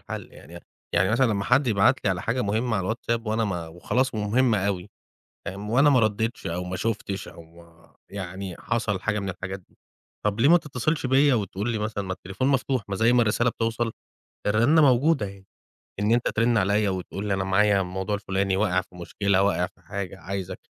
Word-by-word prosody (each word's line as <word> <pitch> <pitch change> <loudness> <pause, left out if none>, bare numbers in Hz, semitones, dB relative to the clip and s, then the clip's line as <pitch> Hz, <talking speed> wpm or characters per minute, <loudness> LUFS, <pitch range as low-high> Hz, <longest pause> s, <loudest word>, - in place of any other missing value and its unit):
الحل، - - -8
يعني 85 +5 -12 0.3
يعني 90 +3 +3
مثلًا 130 +4 +3
لما 100 -4 -1
حد 140 0 +3
يبعت 100 -4 +3
لي 100 - +3
على 95 0 -2
حاجة 120 +5 -1
مهمة 110 +2 0
على 95 - -1
الواتساب، 115 +2 -2
وأنا 110 +1 +1
ما 90 -5 -3
وخلاص 115 +10 -1
مهمة 110 +2 +2
أوي. 100 0 -3 0.6
فاهم؟ 100 +2 -5
وأنا 135 +5 +5
ما 130 -3 +5
رديتش 110 +1 -1
أو 90 +2 -3
ما 90 0 -4
شُفتش، 100 -1 -3
أو 85 +1 -14 0.5
يعني 95 -1 -6
حصل 115 -5 -1
حاجة 105 0 -1
من 100 - -4
الحاجات 95 +1 -6
دي - - -31 0.5
طب 105 +1 0
ليه 140 - +5
ما 175 - +8
تتصلش 150 0 -2
بيا 135 +1 +4
وتقول 105 +1 -2
لي 110 - -1
مثلًا؟ 105 -1 -3
ما 95 - -3
التليفون 95 +8 -3
مفتوح، 135 -2 +1
ما 100 - -2
زي 115 +4 +3
ما 125 -1 +5
الرسالة 115 +2 +2
بتوصل، 115 0 -2 0.5
الرنة 120 +10 +4
موجودة 135 -2 +3
أهي. 95 0 -11 0.6
إن 105 +2 +1
أنت 120 +1 +2
ترن 115 +1 +2
عليّا 100 +1 +2
وتقول 95 +2 -4
لي: 100 - +1
"أنا 95 0 0
معايا 100 +1 +3
الموضوع 95 +2 -2
الفلاني، 95 -1 -1
واقع 95 -3 +2
في 90 0 -20
مشكلة، 95 +2 0
واقع 100 -3 +2
في - - -27
حاجة، 95 +1 -6
عايزك" 95 +1 -5
105 Hz, 195 wpm, -25 LUFS, 95-115 Hz, 0.6 s, ما